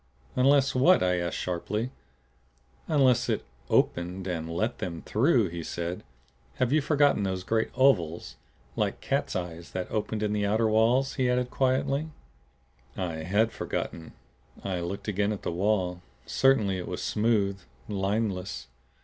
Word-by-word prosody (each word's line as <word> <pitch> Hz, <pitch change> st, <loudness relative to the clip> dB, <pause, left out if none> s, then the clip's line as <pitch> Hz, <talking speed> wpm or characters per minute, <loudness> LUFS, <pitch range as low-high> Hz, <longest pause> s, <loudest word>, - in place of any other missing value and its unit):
"Unless 135 Hz, +1 st, +4 dB
what?" 165 Hz, +9 st, +5 dB
I 90 Hz, -1 st, +2 dB
asked 85 Hz, -1 st, -2 dB
sharply. 105 Hz, +7 st, -2 dB, 1.0 s
"Unless 135 Hz, -5 st, +3 dB
it -, -, -1 dB, 0.2 s
opened 90 Hz, +2 st, +1 dB
and 85 Hz, -3 st, -3 dB
let 110 Hz, +8 st, -1 dB
them 85 Hz, -2 st, -5 dB
through," 120 Hz, -, +3 dB
he 85 Hz, 0 st, -5 dB
said. 85 Hz, +2 st, -4 dB, 0.5 s
"Have 125 Hz, -1 st, 0 dB
you 155 Hz, -, +4 dB
forgotten 145 Hz, -5 st, +3 dB
those 95 Hz, -2 st, -2 dB
great 110 Hz, +3 st, 0 dB
ovals 90 Hz, -, +2 dB, 0.4 s
like -, -, -1 dB
cat's -, -, -1 dB
eyes 85 Hz, -2 st, -5 dB
that 90 Hz, -1 st, -4 dB
opened 110 Hz, 0 st, -2 dB
in 105 Hz, 0 st, 0 dB
the 105 Hz, -1 st, 0 dB
outer 110 Hz, +3 st, +2 dB
walls?" 115 Hz, +5 st, +3 dB
he 130 Hz, -1 st, +2 dB
added 125 Hz, 0 st, 0 dB
quietly. 135 Hz, +3 st, +1 dB, 0.9 s
I 90 Hz, -4 st, -2 dB
HAD 100 Hz, +8 st, +1 dB
forgotten. 80 Hz, -1 st, -4 dB, 0.5 s
I 95 Hz, -2 st, -2 dB
looked 90 Hz, +5 st, -5 dB
again 105 Hz, 0 st, +1 dB
at 105 Hz, -, -5 dB
the -, -, -1 dB
wall. 90 Hz, -1 st, 0 dB, 0.2 s
Certainly 110 Hz, -8 st, +2 dB
it 90 Hz, -, -6 dB
was -, -, -4 dB
smooth, 105 Hz, -3 st, +1 dB, 0.3 s
lineless. 95 Hz, -, -2 dB
105 Hz, 145 wpm, -28 LUFS, 90-125 Hz, 1.0 s, what